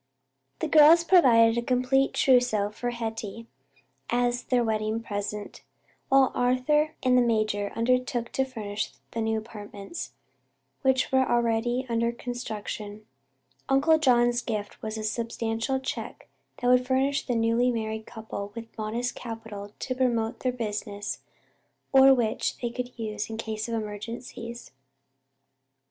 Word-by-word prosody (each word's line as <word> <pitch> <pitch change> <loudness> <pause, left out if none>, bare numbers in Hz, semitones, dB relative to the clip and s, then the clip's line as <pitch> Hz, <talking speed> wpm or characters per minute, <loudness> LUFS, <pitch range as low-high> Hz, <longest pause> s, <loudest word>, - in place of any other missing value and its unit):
The - - 0
girls 315 +2 +7
provided 235 -10 +5
a - - -1
complete 255 +2 +1
trousseau 245 -6 +3
for 245 +3 -3
Hetty, 225 -1 -5 0.6
as 245 0 0
their 245 -2 +2
wedding 220 0 -1
present, 205 -1 -5 0.5
while 270 -1 +5
Arthur 275 +5 +2
and 255 -1 +4
the 250 - +6
major 215 -3 0
undertook 245 0 0
to 265 - +1
furnish 215 - -4 0.2
the 230 - -3
new 220 0 0
apartments, 210 +5 -8 0.7
which 265 -1 +2
were 265 0 +3
already 240 +1 +1
under 235 0 +1
construction. 215 -3 -6 0.6
Uncle 295 +4 +4
John's 240 -4 +3
gift 210 -4 -4
was 215 0 -4
a 215 - -4
substantial 230 +3 -2
check 265 - -6 0.3
that 245 - -2
would 250 0 +4
furnish 270 +2 +1
the 245 - 0
newly 230 +2 +2
married 220 -2 -3
couple 220 -3 -7
with 230 -1 -9
modest 230 +3 -2
capital 225 -3 -7
to 255 - -3
promote 240 -2 0
their 255 - 0
business 210 -3 -4 0.7
or 270 0 +8
which 225 -3 -1
they 240 -1 -3
could 250 0 -6
use 215 -2 -4
in 220 - -5
case 220 -1 -4
of 230 - -1
emergencies. 230 +2 -6
235 Hz, 135 wpm, -27 LUFS, 220-250 Hz, 0.7 s, or